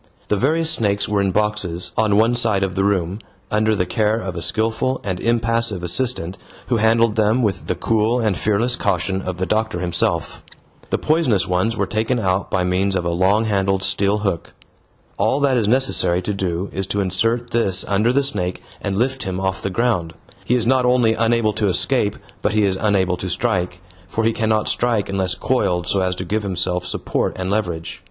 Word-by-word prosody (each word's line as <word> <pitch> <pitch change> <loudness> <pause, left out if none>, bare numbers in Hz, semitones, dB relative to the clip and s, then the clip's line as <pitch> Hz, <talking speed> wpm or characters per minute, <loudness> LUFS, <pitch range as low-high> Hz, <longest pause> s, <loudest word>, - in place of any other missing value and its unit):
The - - +2
various 160 +9 +2
snakes 100 -2 0
were 105 -1 +1
in 100 - +1
boxes, 100 -3 -1
on 105 -2 +2
one 115 +3 +3
side 110 -5 +2
of 95 -2 -2
the 95 - 0
room, 95 -1 0 0.3
under 110 +1 +2
the 90 - 0
care 110 +2 +1
of 95 -5 -4
a 85 - -4
skilful 115 +7 -1
and 95 -4 -3
impassive 115 -4 0
assistant, 95 -1 -1 0.3
who 120 - +2
handled 115 0 +3
them 110 +3 +2
with 100 -4 -1
the - - 0
cool 115 +2 +1
and 110 -5 +1
fearless 110 +6 +1
caution 95 +1 -1
of 95 -2 -5
the 95 - -1
doctor 110 -2 -1
himself. 85 -1 -1 0.5
The - - +1
poisonous 150 - +1
ones 95 +5 0
were 100 - +1
taken 110 +5 -1
out 95 -3 0
by 95 - 0
means 95 +2 0
of 90 - -1
a 85 - 0
long 95 +6 +2
handled 95 -2 0
steel 100 +1 +1
hook. 85 -5 -2 0.7
All 110 +7 +2
that 140 -2 +3
is 115 -4 +1
necessary 105 -8 +2
to 105 - -2
do 95 -1 -2
is 95 0 -3
to 100 +1 -2
insert 115 +6 0
this 95 -5 +2
under 105 +4 +2
the 140 +2 +2
snake 90 -10 -2 0.2
and 95 -1 -2
lift 130 +3 0
him 95 -1 -3
off 95 0 -2
the - - -2
ground. 95 -6 -1 0.3
He 125 - +1
is 120 -3 +1
not 130 +1 +3
only 125 -2 +3
unable 115 -1 +1
to 105 0 0
escape, 105 +2 +1 0.3
but 105 - 0
he 105 0 +2
is 95 -1 +1
unable 95 -3 +1
to 95 - -5
strike, 90 -5 -1 0.3
for 115 - -2
he 115 +1 +2
cannot 110 -2 0
strike 115 -5 0
unless 95 -2 -1
coiled 95 -9 0
so 95 +2 +1
as 90 0 0
to 95 - -5
give 105 +5 -1
himself 90 -2 -1
support 90 - -2
and 95 0 -3
leverage. 85 -6 -2
105 Hz, 200 wpm, -20 LUFS, 95-115 Hz, 0.7 s, one